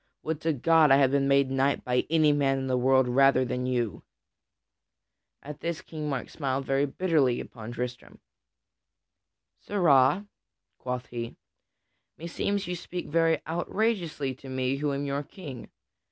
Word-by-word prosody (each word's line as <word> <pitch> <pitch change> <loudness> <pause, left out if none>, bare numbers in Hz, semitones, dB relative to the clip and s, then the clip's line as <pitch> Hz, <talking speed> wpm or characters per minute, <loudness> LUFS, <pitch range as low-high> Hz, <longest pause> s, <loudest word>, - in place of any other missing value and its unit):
Would 160 -1 -3
to 160 0 +1
God 160 +3 +4
I 135 - +7
had 135 -1 +4
been 140 -1 +2
made 140 -1 +3
knight 135 +1 +1
by 125 0 0
any 155 -2 +4
man 135 -2 +1
in 135 - -3
the 130 -1 0
world 130 +1 +3
rather 130 +1 +4
than 125 0 -3
by - - -1
you." 120 -6 -2 1.4
At 150 0 -8
this 170 -2 -3
King 155 -2 -6
Mark 135 -2 -3
smiled 135 -2 -3
very 135 +2 +1
bitterly 145 -5 +1
upon 115 -1 -8
Tristram. 125 0 -6 1.4
"Sirrah," 170 -2 +3 0.5
quoth 125 -1 -4
he, 115 -1 -6 0.8
"meseems 195 +4 -2
you 180 - -3
speak 175 +1 -6
very 165 +1 +2
outrageously 170 - -1
to 135 - -11
me 130 +1 -1
who 145 0 -1
am 140 +1 -2
your 140 0 -2
King. 145 - -10
140 Hz, 155 wpm, -27 LUFS, 130-160 Hz, 1.4 s, I